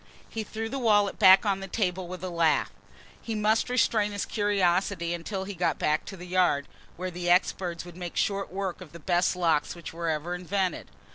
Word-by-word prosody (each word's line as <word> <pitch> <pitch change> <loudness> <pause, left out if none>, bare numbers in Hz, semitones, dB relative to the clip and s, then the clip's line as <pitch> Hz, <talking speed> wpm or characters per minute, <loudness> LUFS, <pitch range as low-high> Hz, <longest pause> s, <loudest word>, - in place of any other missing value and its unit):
He 225 - -4
threw 220 +1 -5
the 270 +4 -4
wallet 210 -4 +3
back 190 0 +8
on 195 -2 +1
the 195 - -6
table 185 -2 -1
with 185 +1 -8
a 185 - -3
laugh. 165 -3 +2 0.5
He 225 - -4
must 215 +3 +2
restrain 220 -4 +2
his 205 - -2
curiosity 190 -4 +1
until 190 +3 -4
he 200 +1 -6
got 180 -1 0
back 150 +1 0
to 195 - -8
the 180 - -9
Yard, 180 -6 +2 0.3
where 185 +1 -4
the 175 0 -3
experts 175 -1 +1
would 175 -2 -11
make 175 -1 -6
short 195 -2 0
work 190 -1 -4
of 165 -4 -11
the 170 - -9
best 175 +2 +1
locks 165 -4 +1
which 170 -2 -9
were 170 0 -2
ever 160 +3 -2
invented. 180 0 -2
185 Hz, 205 wpm, -27 LUFS, 175-200 Hz, 0.5 s, back